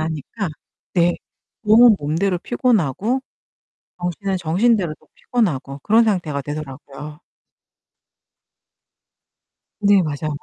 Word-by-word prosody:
하니까 160 - -4 0.5
네. 175 -1 +4 0.5
몸은 220 +1 +7
몸대로 170 +6 0
피곤하고 225 - 0 0.8
정신은 185 +2 -2
정신대로 180 +1 +1
또 - - -26
피곤하고 145 - -2
그런 225 +2 +5
상태가 170 -10 -1
되더라고요. 145 +1 -8 2.6
네, 200 -1 +5
맞아요. 155 0 -3
175 Hz, 225 characters per minute, -20 LUFS, 150-210 Hz, 2.6 s, 몸은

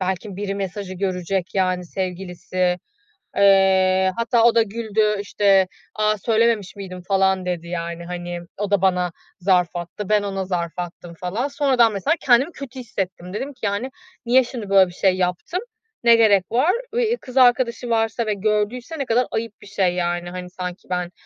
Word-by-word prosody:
belki 190 +1 -3
biri 200 0 -3
mesajı 195 -1 -5
görecek, 185 -1 -2
yani, 185 -2 +1
sevgilisi. 180 0 -2 0.6
Eee, 190 -1 +4
hatta 230 0 +2
o 235 0 +5
da 230 - +6
güldü, 215 -1 0
işte, 200 -2 +3 0.3
"A 215 0 +1
söylememiş 220 -1 +1
miydim 185 -2 -8
falan?" 190 -1 +2
dedi. 175 -2 -3
Yani, 170 0 -4
hani, 175 0 -5 0.2
o 205 0 -3
da 200 -2 +3
bana 180 -2 +2 0.3
zarf 180 -2 +2
attı. 175 +4 -6
Ben 210 -1 +3
ona 195 -1 -3
zarf 175 -3 -2
attım 175 -1 -6
falan. 185 +10 -2
Sonradan 265 -6 +3
mesela 200 - +1
kendimi 260 +5 +4
kötü 270 -4 -9
hissettim. 185 -6 -5
Dedim 275 +7 -4
ki: 250 - -31
"Yani, 205 +5 -1 0.4
niye 255 +2 +5
şimdi 235 -4 -7
böyle 195 -1 +6
bir - - -12
şey 185 +1 +2
yaptım, 180 - -1 0.4
ne 235 -1 +7
gerek 210 -4 +5
var?" 260 +9 +3 0.2
Eee, - - +2
i - - -2
kız 255 - -9
arkadaşı 245 -1 +3
varsa 225 0 +1
ve 215 - 0
gördüyse 215 - -1
ne 275 - -1
kadar 245 +1 +2
ayıp 225 0 -3
bir - - -13
şey, 195 -3 +1
yani. 175 0 -1
Hani, 180 0 -7
sanki 180 0 -7
ben 180 -1 -2
195 Hz, 175 wpm, -22 LUFS, 180-230 Hz, 0.6 s, ne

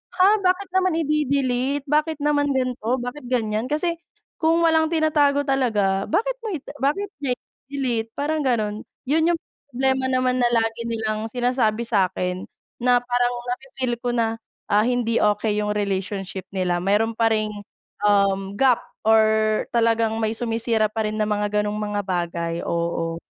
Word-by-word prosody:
"Ha, 390 +4 +5
bakit 370 0 +1
naman 370 -2 +2
ide-delete? 280 -3 0
Bakit 305 0 +1
naman 290 -1 +2
gan'to? 255 -1 -1
Bakit 245 +1 -6
ganiyan?" 220 -3 0
Kasi 335 +4 -1 0.4
kung 330 +1 +3
walang 320 -1 +4
tinatago 305 -3 +2
talaga, 215 -8 +1
bakit - - 0
mo 440 -6 -4
ita 285 - -8
bakit 380 +9 0
niya 265 -3 -1
ide-delete? 250 -4 -4
Parang 305 +2 -1
ganun. 215 -4 -1 0.2
'Yon 320 +3 +3
yung - - -9 0.3
problema 265 +1 +1
naman 255 -1 +1
na 245 - +4
lagi 225 0 0
nilang 220 -1 -2
sinasabi 245 -3 +1
sa'kin 185 -4 0 0.3
na 245 0 +3
parang 245 0 +1 0.2
nafi-feel 255 0 -3
ko 245 - -2
na, 225 -1 0 0.3
ah, 210 +1 +4
hindi 240 -2 +1
okey 210 0 +1
yung 210 0 0
relationship 195 -1 -3
nila, 180 -2 0
meron 205 +5 +2
pa 230 - +3
ring, 215 -1 0 0.5
um, 200 -1 +2
gap 255 +1 +3 0.2
or 220 -1 +3
talagang 230 -1 +2
may 220 - +1
sumisira 225 -1 +1
pa 215 +1 -2
rin 215 - -4
na 215 - +1
mga 210 0 0
gano'ng 210 0 -2
mga 210 -1 -2
bagay, 170 -2 -2
oo. 170 -1 -2
240 Hz, 150 wpm, -23 LUFS, 210-280 Hz, 0.5 s, Ha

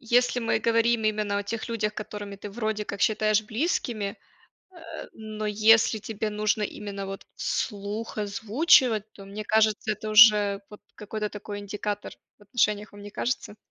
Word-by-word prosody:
если 245 +1 +2
мы 230 - +1
говорим 230 0 +2
именно 210 -1 0
о - - -2
тех 225 +3 -4
людях, 215 -2 -1
которыми 205 -1 -6
ты 200 +1 -8
вроде 215 -1 -2
как 200 -1 -6
считаешь 215 0 +2
близким, 230 0 -1
э, 200 0 -2 1.0
но 215 -1 -6
если 220 +1 +4
тебе 215 0 -4
нужно 210 0 0
именно 200 -1 -5
вот 195 0 -7
вслух 210 +1 -3
озвучивать. 220 - +3
То 195 - -12
мне 205 +2 -7
кажется, 215 0 +2
это 215 +1 -6
уже 210 -2 +7
вот 210 - -12
какой-то 210 0 -4
такой 205 0 -7
индикатор 205 0 -4 0.3
в - - -20
отношениях, 210 0 0
вам 205 0 -12
не 205 - -9
кажется? 220 -1 -3
215 Hz, 160 wpm, -26 LUFS, 205-220 Hz, 1.0 s, уже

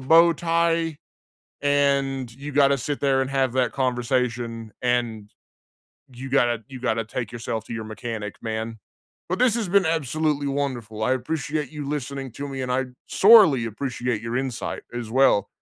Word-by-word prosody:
bow 165 +5 +6
tie, 165 -1 +1 0.7
and 140 -3 +1
you 140 +2 -7
gotta 140 0 +4
sit 140 +3 -3
there 135 -1 +2
and 130 - -4
have 135 -3 +1
that 130 -1 +1
conversation. 120 -3 -1
And 120 -4 -1 0.8
you 130 +2 -7
gotta 120 -4 +2
you 130 -2 -9
gotta 115 -2 0
take 115 +1 -4
yourself 115 -2 -4
to - - -7
your 110 -1 -4
mechanic, 110 -1 -5
man. 110 0 -4 0.5
But 185 - -1
this 250 -2 +4
has 225 -6 -1
been 195 -1 +4
absolutely 155 -1 0
wonderful, 120 -6 -3
I 130 - +2
appreciate 145 +2 -2
you 150 -2 -6
listening 140 -2 -4
to 140 +4 -6
me, 135 -1 -5
and 125 - -2
I 130 +1 0 0.2
sorely 190 - +6
appreciate 120 0 -3
your 115 +1 -3
insight, 130 -2 -3
as 120 -2 -5
well. 130 -6 +4
130 Hz, 160 wpm, -24 LUFS, 120-145 Hz, 0.8 s, bow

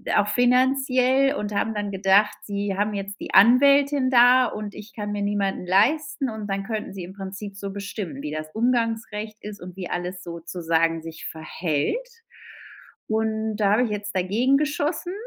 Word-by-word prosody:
auch 205 0 +3
finanziell 260 +3 +3
und 210 -3 -4
haben 220 +2 0
dann 205 -1 -3
gedacht, 200 +2 +3
sie 200 -1 -3
haben 210 +1 0
jetzt 200 0 -5
die - - -7
Anwältin 275 +5 +5
da, 250 +1 +6
und 210 -3 -5
ich 210 +2 -11
kann 210 -1 -5
mir 205 -1 -2
niemanden 200 -2 -1
leisten, 265 - +2
und 220 -2 -6
dann 195 0 -2
könnten 215 -2 -4
sie 190 -2 -6
im 180 - -9
Prinzip 195 +1 -7
so 200 -1 -5
bestimmen, 200 -7 -6
wie 150 - -4
das 155 0 -5
Umgangsrecht 225 -2 -1
ist 210 -2 -8
und 180 0 -9
wie 180 - -5
alles 180 +1 -4
sozusagen 165 -1 -1
sich 160 0 -9
verhält. 160 - -2 1.0
Und 220 0 -1
da 205 -2 +3
hab 215 - +3
ich 225 - -3
jetzt 210 -1 -5
dagegen 220 +9 +2
geschossen. 300 +4 -2
210 Hz, 170 wpm, -24 LUFS, 195-245 Hz, 1.0 s, da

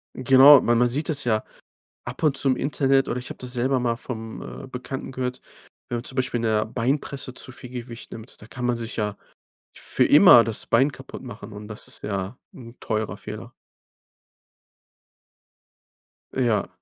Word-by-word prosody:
Genau, 135 +2 +7
weil 120 - +3
man 120 +1 +3
sieht 145 +6 -2
das 145 -2 -1
ja 110 -3 +1 0.6
ab 120 +6 -7
und 140 -3 +3
zu 135 - +2
im 130 - +3
Internet, 135 -1 +1
oder - - -2
ich 125 - -9
habe - - -8
das 125 -1 -8
selber 130 +2 +1
mal 120 -1 0
vom, 115 -3 -7 0.2
äh, - - -9
Bekannten 130 +1 -6
gehört, 125 -1 -4 0.5
wenn 120 - -1
man 115 - -6
zum 130 - -6
Beispiel 130 -2 0
in - - -4
der 110 -1 +1
Beinpresse 130 +3 -2
zu 130 - -5
viel 125 0 -10
Gewicht 120 -1 -8
nimmt, 115 +2 -11
da 105 - -11
kann 125 +1 -5
man 120 -1 +1
sich 115 -1 -6
ja 105 -1 -2 0.6
für - - +2
immer 115 - +8
das 115 -2 -3
Bein 135 +5 +3
kaputtmachen 125 -5 -10
und 105 +1 -9
das 105 -1 -9
ist - - -12
ja 100 +3 -3 0.2
'n 120 -1 -12
teurer 110 -1 -2
Fehler. - - -9 2.8
Ja. 115 -6 +1
125 Hz, 180 wpm, -24 LUFS, 115-130 Hz, 2.8 s, immer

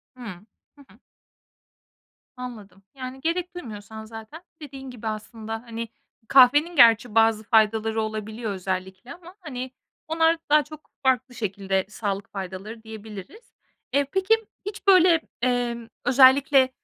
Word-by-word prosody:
Hıı. 210 -7 -9 0.3
Hı 285 - -16
hı. 210 +6 -21 1.4
Anladım. 215 -6 -9
Yani, 260 0 -7
gerek 345 +3 -2
duymuyorsan 220 -6 -8
zaten 225 +9 -10 0.2
dediğin 270 -2 -9
gibi 235 -3 -7
aslında, 215 +1 -5
hani, 230 -1 -6 0.4
kahvenin 290 +7 +6
gerçi 230 -3 +6
bazı 225 -1 +4
faydaları 220 0 +2
olabiliyor 215 +1 -4
özellikle 190 +4 -5
ama, 355 +1 -14
hani, 260 -7 -6 0.4
onlar 325 +1 +3
daha 300 0 +5
çok 305 +1 -13
farklı 255 -1 +1
şekilde 195 -3 -1
sağlık 205 -2 -4
faydaları 195 +4 -7
diyebiliriz. 220 - -11 0.4
Eee, 280 0 +3
peki 385 +4 +3 0.3
hiç 410 0 -7
böyle, 360 -3 +6 0.2
emm, 240 -2 -1 0.2
özellikle 265 +1 +6
235 Hz, 120 wpm, -25 LUFS, 215-280 Hz, 1.4 s, kahvenin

